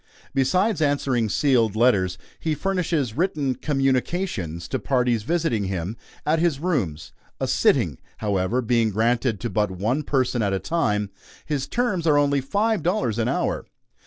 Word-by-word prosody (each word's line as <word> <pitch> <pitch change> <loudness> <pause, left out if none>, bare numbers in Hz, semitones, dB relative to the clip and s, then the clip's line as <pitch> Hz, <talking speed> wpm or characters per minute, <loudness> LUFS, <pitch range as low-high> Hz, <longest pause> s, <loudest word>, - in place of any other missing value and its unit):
Besides 175 - +2
answering 135 -6 +1
sealed 115 -5 +2
letters, 100 -6 +3 0.2
he 160 -1 -1
furnishes 165 - -1
written 155 -5 0
"communications" 130 - -1
to - - -1
parties 125 -4 +1
visiting 155 - 0
him 95 +2 -3 0.3
at 155 +2 +2
his 165 -4 +2
rooms 120 - -2 0.3
a - - -1
"sitting," - - +2 0.2
however, 105 +4 0
being 115 -1 +2
granted 115 +1 +1
to 120 - -2
but 105 -2 +1
one 105 +10 -1
person 130 -4 0
at 100 -2 +1
a 95 - 0
time. 105 - 0 0.3
His 140 -3 -2
terms 205 -9 0
are 150 -2 +5
only 145 -1 +2
five 205 - 0
dollars 135 - 0
an 115 - +1
hour. 130 - -1
130 Hz, 150 wpm, -24 LUFS, 110-155 Hz, 0.3 s, are